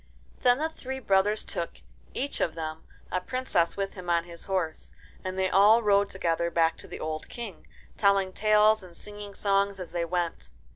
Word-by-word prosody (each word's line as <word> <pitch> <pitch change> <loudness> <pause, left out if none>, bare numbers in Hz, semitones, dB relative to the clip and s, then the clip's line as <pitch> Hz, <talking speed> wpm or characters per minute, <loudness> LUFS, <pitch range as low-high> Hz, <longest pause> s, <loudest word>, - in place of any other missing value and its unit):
Then 245 0 +5
the 310 +3 0
three 265 -4 -6
brothers 205 -3 +2
took, 170 - -4 0.4
each 280 +2 -2
of 165 - 0
them, 160 -1 -5 0.3
a 185 - 0
princess 255 -8 0
with 195 0 -2
him 180 -2 -8
on 170 -1 +3
his 170 -1 -10
horse, 185 -5 -3 0.3
and 185 0 -4
they 190 0 +2
all 210 +5 +6
rode 200 -1 +4
together 170 -2 0
back 165 -1 +2
to - - -12
the - - -8
old 155 0 -4
King, 225 -7 -8 0.3
telling 195 -2 +3
talcs 215 +1 +4
and 180 -2 -13
singing 205 -1 -9
songs 200 -1 +1
as 180 - -7
they 170 -1 -1
went. 170 - -2
195 Hz, 185 wpm, -28 LUFS, 170-210 Hz, 0.4 s, all